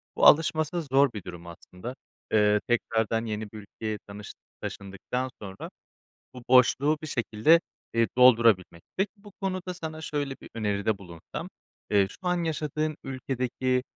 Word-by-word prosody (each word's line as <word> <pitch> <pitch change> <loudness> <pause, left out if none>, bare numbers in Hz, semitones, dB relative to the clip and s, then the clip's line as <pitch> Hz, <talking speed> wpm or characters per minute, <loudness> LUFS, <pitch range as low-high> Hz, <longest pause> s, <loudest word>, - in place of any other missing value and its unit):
Bu - - +3
alışması 155 +2 +4
zor 135 -2 +3
bir 105 -4 -6
durum 85 -1 -9
aslında. 90 +8 -9 0.4
Eee, 105 -1 +5
tekrardan 115 -1 +1
yeni 105 -1 -4
bir 110 - -9
ülkeye 105 +1 -5
tanış 100 0 -9 0.3
taşındıktan 100 +6 -4
sonra 95 -1 -7 0.7
bu 125 - -9
boşluğu 130 +4 +5
bir - - -4
şekilde, 135 +4 +3 0.3
eee, 115 0 +3
doldurabilmek. 115 -9 +5
Peki, 195 +1 +1
bu 205 0 -15
konuda 185 -2 -2
sana 160 -2 -6
şöyle 145 -3 -2
bir - - -11
öneride 105 -1 0
bulunsam: 85 -4 -8 0.4
Eee, 100 -2 +4
şu - - -12
an 175 -1 +1
yaşadığın 155 -1 -2
ülkedeki, 130 -1 -1
125 Hz, 140 wpm, -27 LUFS, 105-155 Hz, 0.7 s, Eee